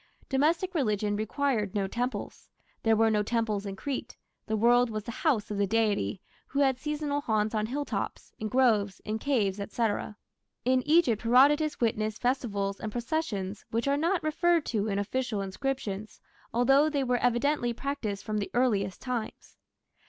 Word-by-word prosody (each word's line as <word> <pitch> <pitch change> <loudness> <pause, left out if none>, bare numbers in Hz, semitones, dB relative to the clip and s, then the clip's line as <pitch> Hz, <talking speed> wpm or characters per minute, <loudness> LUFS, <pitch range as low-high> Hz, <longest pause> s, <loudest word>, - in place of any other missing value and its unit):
Domestic 325 +7 +1
religion 210 - 0
required 220 -1 -1
no 200 -1 +1
temples. 245 +6 -4 0.3
There 225 -1 +3
were 225 0 +4
no 210 -1 +2
temples 215 -2 -1
in 195 - -5
Crete: 275 +7 -5 0.3
the 220 - 0
world 240 +2 +4
was 215 -1 -4
the 235 - -6
"house" 235 -5 0
of 205 - -2
the 200 - +2
deity, 210 -3 0 0.2
who 280 - 0
had 265 -2 +2
seasonal 295 0 -2
haunts 215 -4 0
on 215 -1 0
hilltops, 285 +4 -4
in 215 - -2
groves, 215 -5 +2
in 215 +1 -2
caves, 215 -8 +1
&c. 210 +4 -3 0.8
In 255 0 +3
Egypt 300 -9 +4
Herodotus 285 +6 +4
witnessed 215 -2 0
festivals 205 -6 -1
and 215 - -4
processions 230 -6 -3
which 230 +4 -1
are 280 - +3
not 335 +5 +1
referred 335 +1 +2
to 215 -2 -1
in 200 -2 -1
official 220 +1 -1
inscriptions, 210 0 -4 0.3
although 270 +6 +4
they 285 -3 0
were 250 -1 +1
evidently 245 +1 +1
practised 235 -6 -4
from 215 -1 -1
the 200 - -3
earliest 205 -7 +1
times. 245 -4 -5
235 Hz, 160 wpm, -29 LUFS, 210-275 Hz, 0.8 s, were